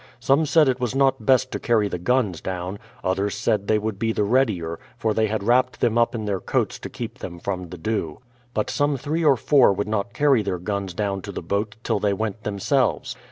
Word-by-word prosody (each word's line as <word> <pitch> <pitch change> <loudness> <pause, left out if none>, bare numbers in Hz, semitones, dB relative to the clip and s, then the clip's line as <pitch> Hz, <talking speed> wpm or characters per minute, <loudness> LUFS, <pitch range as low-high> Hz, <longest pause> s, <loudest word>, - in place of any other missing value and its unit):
Some 140 +5 +2
said 155 0 +5
it 130 -1 +1
was 125 0 -2
not 135 -5 +2
best 130 -1 +3
lo - - -2
carry 110 -4 +2
the 90 - -4
guns 105 -3 +1
down; 95 +1 -4 0.2
others 95 +2 0
said 105 -1 0
they 110 - +3
would 105 -2 -3
be 115 0 +1
the 105 - 0
readier, 100 -8 +1 0.2
for 110 -2 0
they 110 0 +2
had 105 -1 -2
wrapped 125 +3 +2
them 120 -2 +2
up 120 +1 +2
in 110 -2 -3
their 100 -2 -1
coats - - -1
to - - -7
keep - - -7
them 85 - -7
from 90 -1 -4
the 90 - -8
dew. 85 -4 -2 0.4
But 105 - 0
some 145 -1 +1
three 150 +5 -2
or 140 -4 +5
four 135 0 +5
would 105 +2 -2
not 110 +1 -1
carry 140 -3 +4
their 95 -3 -2
guns 95 0 -4
down 100 -2 -1
to 100 - -7
the 90 - -6
boat 100 +5 -2
till 110 -3 0
they 100 0 +1
went 110 +1 -3
themselves. 105 +6 0
110 Hz, 230 wpm, -23 LUFS, 100-125 Hz, 0.4 s, said